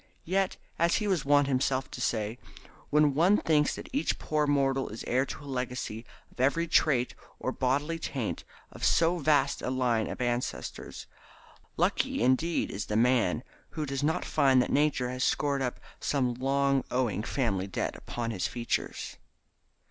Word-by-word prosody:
Yet, 190 Hz, +2 st, 0 dB, 0.2 s
as 170 Hz, +1 st, +3 dB
he 210 Hz, -, 0 dB
was 180 Hz, -8 st, 0 dB
wont 145 Hz, 0 st, +5 dB
himself 130 Hz, 0 st, 0 dB
to 125 Hz, -, -6 dB
say, 110 Hz, 0 st, -1 dB, 0.5 s
when 150 Hz, -1 st, +4 dB
one 175 Hz, +8 st, +4 dB
thinks 150 Hz, -5 st, +2 dB
that -, -, -8 dB
each 280 Hz, -, 0 dB
poor 150 Hz, -1 st, 0 dB
mortal 135 Hz, -2 st, +1 dB
is 110 Hz, -, -7 dB
heir 130 Hz, +2 st, +1 dB
to 145 Hz, -, -7 dB
a -, -, -11 dB
legacy 125 Hz, -4 st, -4 dB, 0.2 s
of -, -, -21 dB
every 140 Hz, +6 st, +2 dB
evil 170 Hz, -, -7 dB
trait 125 Hz, -5 st, +3 dB, 0.2 s
or 130 Hz, -, -2 dB
bodily 145 Hz, +6 st, 0 dB
taint 130 Hz, -8 st, -3 dB, 0.3 s
of -, -, -11 dB
so 170 Hz, +1 st, +3 dB
vast 145 Hz, -2 st, +2 dB
a -, -, -2 dB
line 125 Hz, -4 st, +1 dB
of -, -, -6 dB
ancestors, 120 Hz, 0 st, -3 dB, 0.7 s
lucky -, -, +1 dB
indeed 130 Hz, +7 st, +1 dB
is 100 Hz, -, -4 dB
the 105 Hz, -, -2 dB
man 120 Hz, -2 st, +2 dB, 0.3 s
who 155 Hz, -, -1 dB
does 135 Hz, -1 st, -3 dB
not 160 Hz, +4 st, 0 dB
find 135 Hz, -4 st, +4 dB
that 125 Hz, -, +1 dB
Nature 140 Hz, -4 st, +2 dB
has 125 Hz, +1 st, -2 dB
scored 140 Hz, -2 st, +1 dB
up 125 Hz, -2 st, -2 dB, 0.2 s
some 130 Hz, -4 st, 0 dB
long 135 Hz, +2 st, +1 dB
owing 125 Hz, -5 st, 0 dB
family 110 Hz, -6 st, -1 dB
debt 95 Hz, -, -3 dB
upon 115 Hz, -1 st, -4 dB
his 95 Hz, -5 st, -1 dB
features. 120 Hz, -1 st, -3 dB
135 Hz, 170 wpm, -29 LUFS, 125-150 Hz, 0.7 s, wont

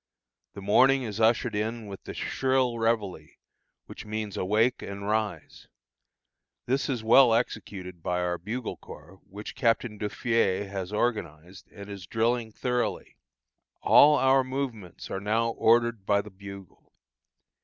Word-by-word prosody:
The 100 Hz, -, -8 dB
morning 130 Hz, +6 st, +4 dB
is 110 Hz, -2 st, -5 dB
ushered 110 Hz, 0 st, +2 dB
in 110 Hz, +2 st, -3 dB
with 100 Hz, -2 st, -10 dB
the -, -, -7 dB
shrill 130 Hz, -3 st, 0 dB
reveille, 105 Hz, -9 st, -1 dB, 0.6 s
which -, -, -10 dB
means 110 Hz, -2 st, -5 dB
awake 110 Hz, +6 st, +1 dB
and 100 Hz, 0 st, -7 dB
arise. 105 Hz, -7 st, -3 dB, 1.0 s
This 135 Hz, +4 st, 0 dB
is 125 Hz, -5 st, -2 dB
well 115 Hz, +1 st, +6 dB
executed 90 Hz, -6 st, -4 dB
by 90 Hz, +2 st, -1 dB
our 90 Hz, -1 st, -1 dB
bugle 110 Hz, +6 st, -5 dB
corps, 85 Hz, +6 st, -13 dB
which 105 Hz, +2 st, -8 dB
Captain 115 Hz, -4 st, 0 dB
Duffié 105 Hz, -2 st, 0 dB
has 95 Hz, -1 st, -5 dB
organized, 95 Hz, -6 st, -3 dB
and 100 Hz, -1 st, -10 dB
is 100 Hz, -3 st, -9 dB
drilling 115 Hz, +1 st, 0 dB
thoroughly. 125 Hz, +2 st, -2 dB, 0.7 s
All 150 Hz, 0 st, +7 dB
our 135 Hz, 0 st, +4 dB
movements 130 Hz, -8 st, -5 dB
are 95 Hz, -, -3 dB
now 115 Hz, +3 st, +1 dB
ordered 115 Hz, -1 st, +2 dB
by 100 Hz, +1 st, +2 dB
the 105 Hz, -, -12 dB
bugle. 100 Hz, -1 st, -12 dB
110 Hz, 135 wpm, -27 LUFS, 100-120 Hz, 1.0 s, All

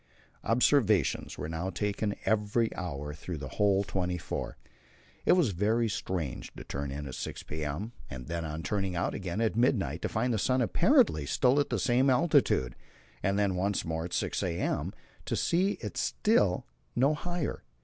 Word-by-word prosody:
Observations 115 Hz, -, +2 dB
were -, -, -4 dB
now 80 Hz, +3 st, -3 dB
taken 105 Hz, +3 st, -1 dB
every 110 Hz, +2 st, +1 dB
hour 75 Hz, -5 st, -4 dB
through 80 Hz, +3 st, -6 dB
the 70 Hz, -2 st, -6 dB
whole 100 Hz, +2 st, +2 dB
twenty 90 Hz, -2 st, -2 dB
four. -, -, -5 dB, 0.7 s
It -, -, +7 dB
was 170 Hz, -, +3 dB
very 110 Hz, +6 st, +1 dB
strange 90 Hz, -, -3 dB
to -, -, -8 dB
turn 70 Hz, 0 st, -4 dB
in 70 Hz, +2 st, -5 dB
at 65 Hz, -, -6 dB
6 -, -, -5 dB
p.m., 75 Hz, +8 st, -4 dB, 0.2 s
and 65 Hz, -2 st, -7 dB
then 85 Hz, +4 st, -3 dB
on 80 Hz, 0 st, -4 dB
turning 95 Hz, -3 st, -1 dB
out 85 Hz, -, 0 dB
again 95 Hz, +1 st, -3 dB
at 110 Hz, -2 st, +1 dB
midnight 105 Hz, -, +1 dB
to -, -, -1 dB
find 120 Hz, +3 st, 0 dB
the 110 Hz, -, 0 dB
sun 130 Hz, +5 st, +2 dB
apparently 80 Hz, -, +3 dB
still 130 Hz, -, +3 dB
at 145 Hz, -, +1 dB
the 120 Hz, -, 0 dB
same 125 Hz, +7 st, +3 dB
altitude, 130 Hz, -, +3 dB, 0.5 s
and 100 Hz, 0 st, +1 dB
then 100 Hz, -2 st, +2 dB
once 95 Hz, +2 st, 0 dB
more 80 Hz, 0 st, -2 dB
at 85 Hz, -, -7 dB
6 -, -, -1 dB
a.m. 85 Hz, -1 st, -1 dB, 0.3 s
to -, -, -1 dB
see 190 Hz, +4 st, +2 dB
it -, -, -7 dB
still 155 Hz, -, +2 dB, 0.3 s
no 135 Hz, +5 st, +4 dB
higher. 175 Hz, 0 st, -3 dB
100 Hz, 175 wpm, -30 LUFS, 80-120 Hz, 0.7 s, It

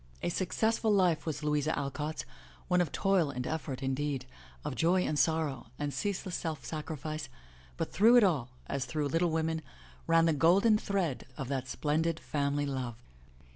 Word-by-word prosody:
A -, -, +1 dB
successful 220 Hz, +5 st, +1 dB
life 180 Hz, -6 st, +3 dB
was 155 Hz, -1 st, -3 dB
Louisa 150 Hz, +1 st, +1 dB
Alcott's, 150 Hz, +2 st, -3 dB, 0.4 s
one 180 Hz, 0 st, +3 dB
of 175 Hz, -, -1 dB
toil 195 Hz, -6 st, +2 dB
and 125 Hz, -2 st, -4 dB
effort, 145 Hz, -4 st, -3 dB
indeed, 135 Hz, 0 st, -1 dB, 0.4 s
of 145 Hz, -, -2 dB
joy 170 Hz, +9 st, +3 dB
and 150 Hz, -1 st, 0 dB
sorrow, 155 Hz, -7 st, +1 dB
and 145 Hz, -1 st, -2 dB
ceaseless 195 Hz, -2 st, -2 dB
self 160 Hz, -3 st, -4 dB
sacrifice, 155 Hz, -2 st, -5 dB, 0.5 s
but -, -, -2 dB
through 225 Hz, +5 st, +6 dB
it 240 Hz, -, +8 dB
all, 150 Hz, -11 st, +2 dB, 0.2 s
as 140 Hz, -1 st, -2 dB
through 145 Hz, +3 st, -1 dB
Little 165 Hz, +4 st, +2 dB
Women 160 Hz, 0 st, 0 dB, 0.5 s
ran 165 Hz, 0 st, +5 dB
the 165 Hz, -, +3 dB
golden 195 Hz, +8 st, +5 dB
thread 185 Hz, -14 st, -1 dB
of 135 Hz, -, -4 dB
that 130 Hz, -2 st, -2 dB
splendid 160 Hz, +4 st, 0 dB
family 145 Hz, -1 st, -1 dB
love. 130 Hz, -4 st, -3 dB
155 Hz, 165 wpm, -31 LUFS, 140-175 Hz, 0.5 s, it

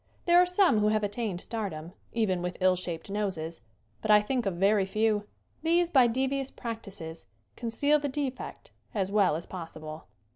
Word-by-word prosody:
There 345 Hz, 0 st, +6 dB
are 360 Hz, -, +3 dB
some 360 Hz, -, +4 dB
who 210 Hz, -, +3 dB
have 215 Hz, 0 st, +2 dB
attained 205 Hz, -3 st, -2 dB
stardom, 185 Hz, -7 st, -5 dB, 0.2 s
even 200 Hz, -6 st, 0 dB
with 180 Hz, 0 st, -3 dB
ill 185 Hz, -1 st, +4 dB
shaped 175 Hz, +1 st, -4 dB
noses, 175 Hz, -, -2 dB, 0.4 s
but -, -, -4 dB
I 210 Hz, 0 st, +8 dB
think 240 Hz, +1 st, -1 dB
of 190 Hz, -, -1 dB
very 200 Hz, +3 st, +3 dB
few. 210 Hz, +1 st, +1 dB, 0.3 s
These 340 Hz, +2 st, +2 dB
by 260 Hz, -5 st, +6 dB
devious 265 Hz, +3 st, 0 dB
practices 200 Hz, -, -7 dB, 0.3 s
conceal 285 Hz, +6 st, +1 dB
the 290 Hz, 0 st, -2 dB
defect 270 Hz, -1 st, -5 dB, 0.2 s
as 195 Hz, -2 st, 0 dB
well 200 Hz, -6 st, +4 dB
as 165 Hz, -, -4 dB
possible. 160 Hz, -3 st, -8 dB
210 Hz, 170 wpm, -29 LUFS, 185-255 Hz, 0.4 s, I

